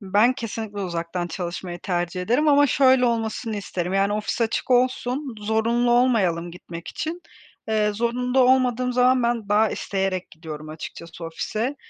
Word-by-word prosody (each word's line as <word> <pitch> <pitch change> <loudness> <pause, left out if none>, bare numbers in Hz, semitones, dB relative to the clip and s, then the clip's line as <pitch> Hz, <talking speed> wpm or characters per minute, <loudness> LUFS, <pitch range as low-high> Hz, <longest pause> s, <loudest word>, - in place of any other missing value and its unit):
Ben 210 +5 +3
kesinlikle 220 -3 -5
uzaktan 175 -1 -3
çalışmayı 175 0 -5
tercih 175 -1 -2
ederim 250 +10 +2
ama 290 0 +6
şöyle 260 -1 +4
olmasını 225 -1 -2
isterim. 180 -2 -3
Yani, 195 +1 +2
ofis 210 +3 -2
açık 230 +3 -1
olsun, 250 +1 +1
zorunlu 225 +3 +1
olmayalım 200 -9 +2
gitmek 170 -1 -9
için. 335 +3 -5 0.5
Eee, 210 -1 +2
zorunda 250 +4 0
olmadığım 250 -1 +3
zaman 250 +1 +4
ben 235 -3 -1
daha 215 +1 +3
isteyerek 190 -2 -2
gidiyorum 155 -1 -9
açıkçası 165 +2 -8
ofise, 220 - -3
220 Hz, 140 wpm, -23 LUFS, 180-250 Hz, 0.5 s, ama